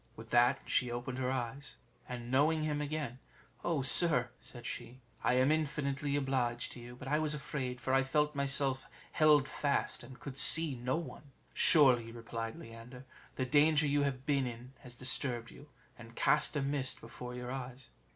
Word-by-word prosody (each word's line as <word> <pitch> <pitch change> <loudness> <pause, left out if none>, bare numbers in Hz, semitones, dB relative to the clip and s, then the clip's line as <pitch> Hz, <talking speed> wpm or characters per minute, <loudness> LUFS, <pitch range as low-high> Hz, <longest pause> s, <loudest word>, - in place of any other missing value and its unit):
With 115 +1 -12
that 120 +2 +4
she 125 - +1
opened 120 +2 -4
her 130 -1 -1
eyes, 130 +2 -4 0.3
and 120 -1 -6
knowing 155 +4 +3
him 150 -1 -1
again, 145 -4 -4 0.4
"Oh 160 -6 0
sir," 130 -4 +4
said 120 -2 -12
she, 125 +2 -6 0.2
"I 125 - +3
am 130 +3 +4
infinitely 145 -2 -1
obliged 130 -4 -1
to - - -9
you; 120 +1 -10
but 130 +1 -10
I 150 +2 +1
was 155 -1 0
afraid, 130 -3 -4
for 130 - -2
I 135 - +5
felt 150 +3 +1
myself 140 -1 0 0.2
held 150 -3 +4
fast, 140 -1 -1
and 130 -1 -12
could 140 -1 -6
see 160 0 +5
no 125 +2 -2
one." 155 -3 -7 0.2
"Surely," 130 -9 +5
replied 115 -1 -6
Leander, 115 +3 -11 0.3
"the 130 - -1
danger 150 +3 +4
you 145 0 +2
have 135 -2 -2
been 140 -3 +1
in 120 +2 -9
has 125 -1 -11
disturbed 120 -2 -3
you, 145 - -14 0.3
and 115 0 -12
cast 150 +1 +2
a 145 - 0
mist 135 -2 -1
before 125 +2 -9
your 125 0 -6
eyes." 130 0 -7
130 Hz, 180 wpm, -33 LUFS, 125-145 Hz, 0.4 s, I